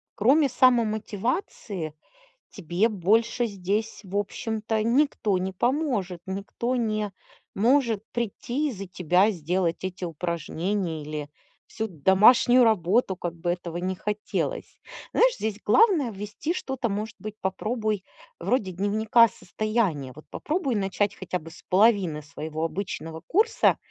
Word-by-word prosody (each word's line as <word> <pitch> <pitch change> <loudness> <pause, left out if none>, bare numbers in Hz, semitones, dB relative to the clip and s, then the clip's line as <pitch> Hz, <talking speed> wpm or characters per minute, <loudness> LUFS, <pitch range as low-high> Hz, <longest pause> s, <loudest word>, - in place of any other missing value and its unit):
кроме 270 +6 +4
самомотивации 220 - 0 0.6
тебе 180 +2 0
больше 225 +5 +2
здесь, 205 +2 -2
в 195 +1 -8
общем-то, 220 +1 -2
никто 235 -5 +2
не 185 +1 -2
поможет. 230 - -1
Никто 200 +6 -3
не 215 -3 -1 0.4
может 230 -1 +2
прийти 240 +5 -2
и - - -3
за 195 -4 -7
тебя 180 +3 +3
сделать 175 0 -1
эти 185 -1 -4
упражнения 170 +1 -2
или 150 0 -5 0.4
всю 220 - -3
домашнюю 210 - +5
работу, 205 -1 +2
как 175 -3 -4
бы 175 +1 -3
этого 175 -1 -5
ни 185 +2 -1
хотелось. 210 - -3 0.3
Знаешь, - - +4
здесь 215 -1 -3
главное- 295 - +4
ввести 210 - -4
что-то, 265 -8 -3
может 210 +2 -3
быть, 215 0 -7
попробуй 215 +1 -2 0.3
вроде 215 -7 0
дневника 215 +5 +4
состояния, 195 - -2
вот 155 - -13
попробуй 300 -6 -1
начать 200 0 0
хотя 180 -1 -3
бы 165 0 -12
с - - -15
половины 190 -6 +3
своего 155 +2 -5
обычного 165 -2 -4
курса 435 +6 +3
205 Hz, 125 wpm, -26 LUFS, 180-235 Hz, 0.6 s, домашнюю